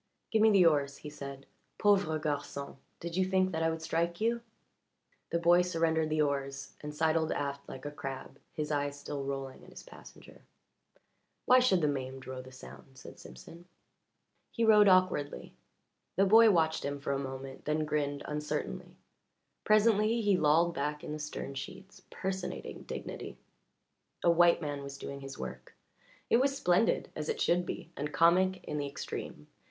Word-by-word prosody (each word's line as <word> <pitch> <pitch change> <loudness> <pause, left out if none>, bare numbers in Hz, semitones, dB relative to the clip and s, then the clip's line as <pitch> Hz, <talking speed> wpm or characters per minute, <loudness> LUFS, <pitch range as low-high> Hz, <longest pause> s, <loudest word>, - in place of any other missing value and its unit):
"Give 220 - +3
me 220 - +7
the 195 -4 +5
oars," 145 -3 +2
he 150 - -9
said. 140 -2 -8 0.3
"Pauvre 195 -7 +3
garçon 145 -2 -4 0.2
did 170 0 -5
you 190 - +3
think 185 0 +1
that 160 -2 -2
I 165 - +2
would 160 0 -4
strike 170 +2 -1
you?" 235 +2 +1 0.9
The - - 0
boy 170 +1 +5
surrendered 165 -3 +1
the 155 0 +2
oars 140 -1 -3
and 150 - -5
sidled 160 +1 +1
aft 140 0 -3
like 130 +1 -9
a 145 - -4
crab, 135 -1 -7
his 150 -1 -4
eyes 145 -1 -1
still 145 -1 -5
rolling 135 -1 -5
at - - -14
his - - -11
passenger. - - -15 1.0
"Why 255 0 +7
should 220 -8 +3
the 150 - +3
maimed 135 -2 -4
row 130 0 -6
the 130 0 -13
sound?" 130 +1 -13
said - - -12
Simpson. 65 - -12 0.8
He 230 - 0
rowed 210 -2 +7
awkwardly. 185 -6 +2 0.6
The 195 - +4
boy 225 +3 +7
watched 160 -4 +2
him 140 0 -3
for 140 - -3
a 135 - -1
moment, 135 0 -7
then 155 +1 0
grinned 145 -1 -1
uncertainly; 150 0 -4 0.7
presently 215 +1 +4
he 205 -2 +3
lolled 165 +1 +3
back 150 +1 -3
in - - -6
the 155 - -4
stern 150 -2 -5
sheets, 190 +7 -9
personating 190 -1 -5
dignity. - - -7 0.9
A 170 - +5
white 170 0 +4
man 145 -1 -3
was 140 0 -7
doing 140 0 -7
his 135 0 -8
work - - -8 0.5
it - - +4
was 275 +2 +1
splendid, 180 +3 +2
as - - -4
it 455 - -2
should 175 +1 +2
be, 170 -2 -6
and 150 +1 -4
comic 180 +5 +3
in 150 - -4
the 145 - -2
extreme. 105 - -6
155 Hz, 170 wpm, -31 LUFS, 140-185 Hz, 1.0 s, me